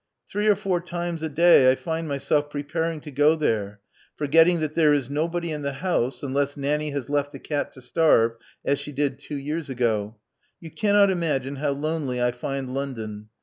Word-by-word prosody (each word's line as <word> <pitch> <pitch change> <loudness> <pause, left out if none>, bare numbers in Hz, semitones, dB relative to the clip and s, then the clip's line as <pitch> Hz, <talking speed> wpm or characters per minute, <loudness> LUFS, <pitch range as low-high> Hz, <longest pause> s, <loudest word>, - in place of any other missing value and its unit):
Three 210 +1 0
or 210 - +6
four 190 -3 -1
times 175 -1 -4
a 160 - -2
day 155 -4 +6
I - - +1
find 165 +2 -4
myself 145 +1 0
preparing 155 +2 -3
to 150 - -9
go 145 +3 +4
there, 105 -9 -1 0.3
forgetting 165 +4 +4
that 155 -1 -2
there 155 -3 +4
is 135 -2 -2
nobody 170 +3 -1
in 150 -1 -4
the 140 -1 -2
house, 135 -6 -1
unless 140 +1 -1
Nanny 150 +2 -1
has 140 -3 -4
left 145 0 0
the - - -6
cat 145 +1 -3
to 130 - -13
starve, 125 -4 +3 0.3
as 140 - +1
she 145 - -6
did 140 -1 -1
two 145 0 -6
years 150 +2 -4
ago. 115 -4 -1 0.4
You 165 -2 -10
cannot 205 0 +3
imagine 140 -6 -1
how 145 0 0
lonely 145 -3 -2
I 120 0 +2
find 130 +1 -4
London. 110 -6 -5
145 Hz, 190 wpm, -24 LUFS, 135-165 Hz, 0.4 s, or